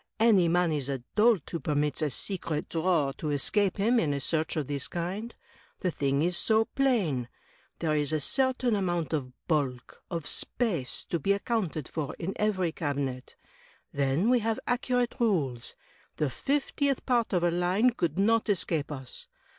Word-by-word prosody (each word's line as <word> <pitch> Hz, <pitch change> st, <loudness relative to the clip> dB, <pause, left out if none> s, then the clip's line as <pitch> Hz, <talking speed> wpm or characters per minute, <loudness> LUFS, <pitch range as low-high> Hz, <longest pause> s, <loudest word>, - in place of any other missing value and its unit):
Any 210 Hz, -6 st, +5 dB
man 175 Hz, 0 st, +2 dB
is 145 Hz, -3 st, -1 dB
a 135 Hz, -3 st, -3 dB
dolt 215 Hz, -6 st, +4 dB
who 170 Hz, -, -2 dB
permits 150 Hz, +1 st, 0 dB
a 155 Hz, -, +1 dB
'secret* 160 Hz, 0 st, -2 dB
drawer 160 Hz, -4 st, +1 dB
to 155 Hz, -, -2 dB
escape 190 Hz, +8 st, +1 dB
him 230 Hz, +5 st, +3 dB
in 145 Hz, -6 st, +1 dB
a -, -, -2 dB
search 160 Hz, +3 st, -1 dB
of 155 Hz, -3 st, -1 dB
this 140 Hz, 0 st, -2 dB
kind. 190 Hz, +7 st, -4 dB, 0.5 s
The 180 Hz, -, +1 dB
thing 140 Hz, -1 st, 0 dB
is 175 Hz, +1 st, +1 dB
so 220 Hz, +4 st, +3 dB
plain. 195 Hz, -, +1 dB, 0.5 s
There 155 Hz, -2 st, 0 dB
is 150 Hz, -1 st, 0 dB
a 155 Hz, -, +1 dB
certain 255 Hz, -, +1 dB
amount 175 Hz, -5 st, -1 dB
of 135 Hz, -5 st, -2 dB, 0.2 s
bulk 135 Hz, -6 st, -1 dB
— -, -, -49 dB
of 170 Hz, -4 st, -3 dB
space 175 Hz, -, -2 dB
— -, -, -50 dB
^to 170 Hz, -, 0 dB
be 200 Hz, -, +3 dB
accounted 200 Hz, -, -2 dB
for 150 Hz, -4 st, -4 dB
in 185 Hz, +3 st, -3 dB
every 190 Hz, -5 st, +1 dB
cabinet. 140 Hz, -5 st, -3 dB, 0.6 s
Then 140 Hz, -, +2 dB
we 250 Hz, -, +5 dB
have 225 Hz, 0 st, -1 dB
accurate 245 Hz, -1 st, 0 dB
rules. 145 Hz, -, 0 dB, 0.4 s
The 150 Hz, -4 st, 0 dB
fiftieth 280 Hz, -, 0 dB
part 240 Hz, -3 st, +2 dB
of 180 Hz, -3 st, +1 dB
a 175 Hz, -, +3 dB
line 180 Hz, +8 st, +3 dB
could 170 Hz, -, -2 dB
not 225 Hz, +3 st, +3 dB
escape 170 Hz, -6 st, 0 dB
us. 130 Hz, -3 st, -7 dB
170 Hz, 175 wpm, -29 LUFS, 145-215 Hz, 0.6 s, Any